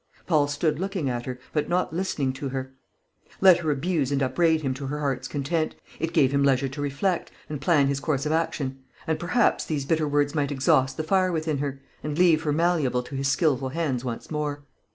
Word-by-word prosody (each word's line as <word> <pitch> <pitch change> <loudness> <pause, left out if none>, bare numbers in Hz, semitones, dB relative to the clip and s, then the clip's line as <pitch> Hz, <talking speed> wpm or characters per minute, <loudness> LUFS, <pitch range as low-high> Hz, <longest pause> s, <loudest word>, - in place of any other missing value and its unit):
Paul 150 -4 +3
stood 150 +1 0
looking 185 -8 -2
at 120 0 -4
her, 125 -1 -4 0.2
but 150 - 0
not 180 -2 0
listening 160 -7 -1
to 135 +1 -5
her. 130 0 -5 0.7
Let 185 -2 +7
her 160 -2 -2
abuse 145 -1 0
and 140 -1 +1
upbraid 160 +5 +2
him 135 -2 0
to 135 +1 -6
her 150 +2 -3
heart's 135 -3 -2
content; 155 +3 -1 0.2
it 165 - -1
gave 150 -6 +3
him 140 0 +2
leisure 135 -1 +3
to 145 +2 -6
reflect, 145 +6 -1 0.2
and 150 -2 -5
plan 150 -2 +4
his 140 0 0
course 140 -2 -1
of 150 - 0
action; 145 -4 -1 0.3
and 160 -1 -1
perhaps 225 +7 +2
these 145 -4 -2
bitter 155 +1 +1
words 145 0 +1
might 145 -2 0
exhaust 135 -1 +2
the 155 - -1
fire 185 +2 +2
within 155 -3 -1
her, 140 -1 -4 0.2
and 150 0 -3
leave 170 -3 +5
her 155 -2 -1
malleable 150 -6 +1
to 135 - -8
his 135 0 0
skilful 140 -2 +1
hands 135 -5 -2
once 120 +2 -5
more. 150 -1 -3
145 Hz, 215 wpm, -25 LUFS, 135-160 Hz, 0.7 s, Let